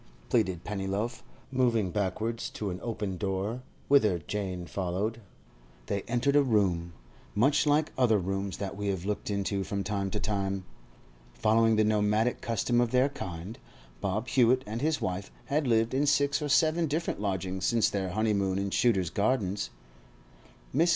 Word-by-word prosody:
pleaded 90 -2 +1
Pennyloaf, 105 +4 -3 0.3
moving 120 -7 +2
backwards 110 +4 -2
to 105 -3 -4
an 90 - -5
open 105 -5 -3
door, 100 +5 -2 0.3
whither 110 -10 +4
Jane 90 +1 -4
followed. 100 +6 -2 0.6
They 100 -1 -1
entered 125 +4 +1
a 145 - +7
room—much 100 - 0
like 150 +1 +3
other 115 -4 +4
rooms 95 +1 -2
that 100 -1 -4
we 100 0 -3
have 95 -2 -2
looked 105 +1 -2
into 100 -1 -1
from 100 0 -3
time 100 -1 -2
to 105 - -3
time. 95 -2 -2 0.7
Following 115 +1 +3
the 110 - +4
nomadic 105 +2 +2
custom 120 +1 +1
of 120 - +1
their 130 +3 +3
kind, 90 -3 -7 0.4
Bob 105 - -2
Hewett 130 0 +4
and 110 +3 -4
his 155 +1 +1
wife 95 +2 -3 0.2
had 145 0 0
lived 115 0 +2
in 140 +3 +2
six 145 0 +2
or 150 - -2
seven 160 +4 +3
different 155 -6 -2
lodgings 95 -2 -1
since 115 -3 +3
their 95 -2 -2
honeymoon 100 -1 +1
in 100 0 -2
Shooter's 95 -9 +2
Gardens. 100 -1 0 1.1
Mrs. 165 +5 +4
105 Hz, 155 wpm, -29 LUFS, 95-120 Hz, 1.1 s, a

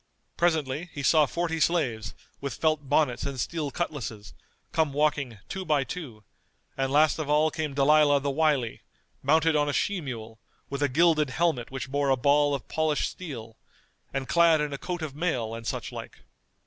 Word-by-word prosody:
Presently 160 -1 0
he 145 - -5
saw 155 0 +5
forty 165 +2 -2
slaves, 125 -11 0 0.2
with 140 -3 -4
felt 155 -3 0
bonnets 145 -4 +2
and 140 -2 -4
steel 155 +3 -2
cutlasses, 130 -10 -5 0.4
come 160 -4 +1
walking, 140 -5 0
two 190 - -4
by 150 -5 +2
two; 130 -9 -7 0.5
and 135 0 -1
last 150 +2 +4
of 150 -2 -3
all 155 +1 +3
came 155 -4 -3
Dalilah 145 0 +5
the 140 0 -1
Wily, 140 -5 +1 0.4
mounted 160 +3 +3
on 145 -1 +2
a - - -1
she 200 +3 0
mule, 115 -5 -7 0.3
with 140 0 -3
a 145 - +2
gilded 155 +1 +3
helmet 150 -4 0
which 135 0 -6
bore 140 0 +1
a 135 - +3
ball 145 +2 +3
of 135 - -7
polished 155 -2 0
steel, 115 -11 -8 0.5
and 135 -1 -3
clad 170 -2 +5
in 150 -1 -2
a 140 - -5
coat 175 -2 -4
of 145 -3 -5
mail, 130 -9 -1
and 115 0 -7
such - - -3
like. - - -9
145 Hz, 180 wpm, -27 LUFS, 135-160 Hz, 0.5 s, saw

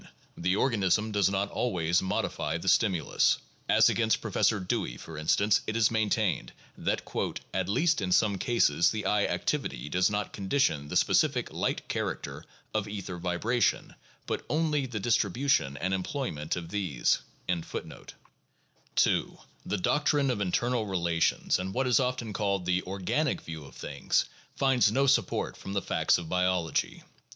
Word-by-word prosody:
The 90 +2 0
organism 105 -2 +1
does 100 -2 +3
not 100 +1 -1
always 85 -7 +1
modify 80 -4 -2
the 85 - -8
stimulus. 95 -6 +3 0.3
As - - +6
against 110 -1 +2
Professor 110 0 +1
Dewey, 90 -8 -2
for 80 - -10
instance, 100 +7 +2
it 110 - -2
is 115 -1 +3
maintained 110 -2 0 0.2
that - - -1 0.5
"at - - -1
least 160 - +2
in 90 -2 -2
some 100 0 +3
cases 85 - +3
the 110 -2 -3
eye 105 -1 +2
activity 65 +2 -2
does 90 +5 +2
not 105 -1 -3
condition 95 - 0
the - - -6
specific - - +2
light - - -2
character - - -4 0.3
of 110 -1 -1
ether 100 -4 -6
vibration, 90 +6 0 0.3
but - - -3
only 150 -3 +1
the 115 -4 -4
distribution 115 - +1
and 90 +4 -1
em 95 - 0
ployment 85 - -3
of 85 -2 -6
these" 95 -11 0 0.3
(p. 90 -2 0
417). - - -8 0.8
2. - - +2 0.3
The 105 - 0
doctrine 145 +6 +2
of 110 -4 -2
internal 115 +4 0
relations 85 -4 +1
and 95 +3 -4
what 130 +1 +1
is 125 -4 +4
often 125 -4 -2
called 100 -3 -1
the 90 0 +1
"organic" 100 - -1
view 80 -2 -8
of 70 - -14
things - - -1 0.3
find 130 -6 +3
no 135 +5 +2
support 140 - +1
from 95 - -7
the 100 - 0
facts - - +2
of 85 -2 -6
biology. 90 -1 0
100 Hz, 155 wpm, -29 LUFS, 90-115 Hz, 0.8 s, As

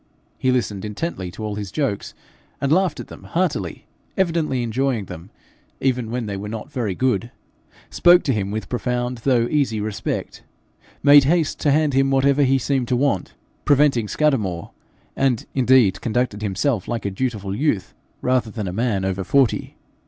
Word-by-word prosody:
He 130 - +1
listened 105 -6 -1
intently 105 - -4
to 110 - -8
all 105 - -3
his 100 -3 -5
jokes, 135 -8 -2 0.4
and 140 - -1
laughed 180 -1 +2
at - - -6
them - - -12
heartily, 165 - -2 0.3
evidently 165 -8 0
enjoying 120 -1 -1
them 85 +2 -10 0.5
even 125 -4 0
when 120 0 -3
they 100 -1 -4
were 100 +2 -5
not 110 +6 -7
very 115 -9 -2
good; 120 -3 0 0.6
spoke 175 0 +5
to 135 - +1
him 100 -3 -1
with 110 +2 -4
profound 125 0 -2
though 120 -1 +2
easy 135 -7 0
respect; 105 0 -4 0.6
made 145 -1 +8
haste 160 +1 +1
to 145 - +2
hand 150 0 +2
him 135 +1 +3
whatever 135 +1 +3
he 135 -1 +4
seemed 130 -1 -1
to 125 - +1
want, 130 -7 0 0.3
preventing 140 -6 +3
Scudamore; 105 - 0 0.4
and 130 -4 +1
indeed 125 -7 +4
conducted 115 -2 -1
himself 105 +2 -1
like 115 -3 -3
a 100 - -1
dutiful 100 -3 -3
youth, 115 - -1 0.3
rather 125 -3 +1
than 105 -3 -5
a 90 - -4
man 105 -3 0
over 95 0 -2
forty. 135 +5 +1
125 Hz, 165 wpm, -21 LUFS, 105-140 Hz, 0.6 s, made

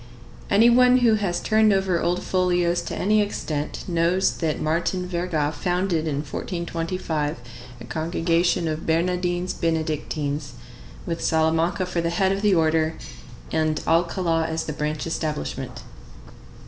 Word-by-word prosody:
Any 215 +4 +5
one 250 +1 +6
who 225 - +5
has 195 -5 0
turned 215 -1 +3
over 190 -3 +1
old 175 +1 0
folios 175 -2 +1
to - - -4
any 210 +2 +2
extent 155 -7 -3
knows 175 +2 +2
that 160 -3 -1
Martin 175 +3 -1
Verga 170 -4 -1
founded 175 +1 -1
in 145 -2 -1
1425 165 -1 -3 0.4
a - - -8
congregation 165 +2 0
of 155 0 -4
Bernardines 175 +2 0
Benedictines, 155 -3 -2 0.5
with 165 -1 -3
Salamanca 160 +3 +1
for 180 -1 -2
the 170 - 0
head 190 +3 +1
of 195 0 -1
the 205 -2 +3
order, 160 -1 +2 0.6
and 155 -1 +1
Alcala 165 0 +1
as 160 0 -2
the 155 - -4
branch 150 +1 -3
establishment. 155 - -4
170 Hz, 135 wpm, -24 LUFS, 160-180 Hz, 0.6 s, one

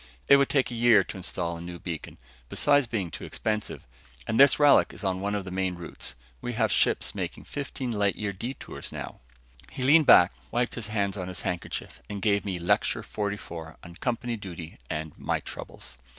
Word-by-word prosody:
"It 140 - +8
would 140 -1 +3
take 135 -3 +2
a - - -4
year 115 -2 +5
to - - -8
install 85 -2 -3
a - - -8
new 85 0 -7
beacon 85 -4 -6 0.3
besides 145 -3 +3
being 100 -7 -2
too - - -7
expensive 105 -1 -3 0.4
and 110 +2 0
this 140 0 +8
relic 145 -1 +5
is - - -7
on 95 -1 0
one 100 +1 -1
of 100 -2 -3
the 95 - -6
main 95 -1 -1
routes. 85 -2 -5 0.3
We 120 - -3
have 110 -1 +1
ships - - +2
making - - -4
fifteen 135 -3 -4
light 100 -4 +1
year 105 -2 -3
detours 120 +8 -6
now." - - -7 0.5
He 135 -2 -5
leaned 150 +3 +6
back, - - +8 0.2
wiped 120 0 0
his 115 -3 -3
hands 100 -2 -1
on 90 - -4
his 90 -2 -2
handkerchief 90 -1 -4
and 105 -1 -4
gave 100 0 +2
me 95 -3 -1
Lecture 85 0 +1
Forty 105 -1 -3
four 80 -4 -9
on 85 - -10
Company 120 +4 -2
Duty 85 -6 -8
and 80 -1 -4
My - - 0
Troubles. 60 - -8
100 Hz, 200 wpm, -27 LUFS, 90-120 Hz, 0.5 s, It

